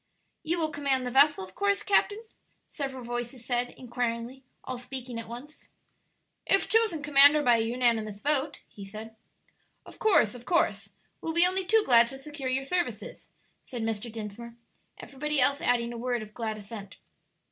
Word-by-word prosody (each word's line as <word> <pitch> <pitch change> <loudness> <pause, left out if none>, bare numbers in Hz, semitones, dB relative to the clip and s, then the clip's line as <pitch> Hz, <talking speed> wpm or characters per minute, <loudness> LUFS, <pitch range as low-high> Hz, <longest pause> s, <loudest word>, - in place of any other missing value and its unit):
"You 335 +2 -1
will 315 -2 -1
command 275 -3 0
the 250 - -3
vessel, 280 -4 +4
of 185 0 -11
course, 400 0 0
captain?" 410 +2 +1 0.4
several 265 -3 -6
voices 240 0 -5
said, 245 -1 0
inquiringly, 245 +1 -4 0.2
all 255 -1 -5
speaking 250 -2 -6
at 230 - -8
once. 250 +7 -11 0.8
"If 390 - +3
chosen 440 -9 +2
commander 290 +1 +6
by 245 -3 +5
a - - +1
unanimous 230 -4 +1
vote," 290 +2 0
he 200 - -12
said. 215 +3 -9 0.7
"Of - - -14
course, 390 - +3
of 245 -1 -11
course; 340 +5 0 0.3
we'll 325 - -3
be 340 +1 +5
only 370 +1 0
too 440 +3 +4
glad 235 -2 +6
to 270 - -6
secure 280 -1 -6
your 265 +1 0
services," 350 +5 -3 0.3
said 240 -3 -6
Mr. 225 +1 -3
Dinsmore, 225 +2 -8 0.4
everybody 300 +2 -3
else 280 +2 +3
adding 240 -1 +1
a 235 - -7
word 245 -1 -2
of 215 0 -13
glad 220 -2 -4
assent. 205 -1 -10
255 Hz, 170 wpm, -28 LUFS, 230-295 Hz, 0.8 s, commander